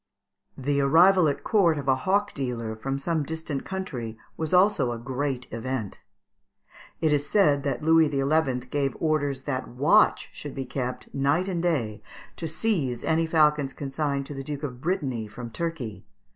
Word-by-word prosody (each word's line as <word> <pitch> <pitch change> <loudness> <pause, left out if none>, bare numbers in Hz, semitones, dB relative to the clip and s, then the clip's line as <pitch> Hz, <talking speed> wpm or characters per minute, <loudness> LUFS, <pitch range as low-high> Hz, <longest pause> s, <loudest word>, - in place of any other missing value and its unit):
The 140 +1 0
arrival 170 +5 +6
at 140 - -1
court 180 -8 +3
of 140 -1 -5
a 135 - +5
hawk 195 +9 0
dealer 120 -5 -3
from 135 +5 -3
some 160 +3 -1
distant 155 -1 -4
country 125 -13 -5 0.2
was 160 -1 -3
also 185 -8 +4
a 120 - -3
great 130 +1 -3
event. 115 -3 -4 1.0
It 155 -2 +3
is 145 0 0
said 150 -9 +4
that 140 +2 -2
Louis 160 -1 +5
XI. 140 -2 +1
gave 140 -3 0
orders 145 -4 0
that 130 -3 -3
watch 135 +5 +3
should 145 - -8
be 135 -1 -3
kept 125 0 -5
night 140 +7 +1
and 175 -3 -1
day 125 - -1 0.4
to 165 - -3
seize 155 - -1
any 165 +1 +1
falcons 150 -4 +3
consigned 140 0 -2
to 145 - -7
the 135 -1 -6
Duke 145 +1 -5
of 125 -4 -5
Brittany 135 - -1
from 115 +3 -8
Turkey. 120 - -4
140 Hz, 165 wpm, -26 LUFS, 130-160 Hz, 1.0 s, arrival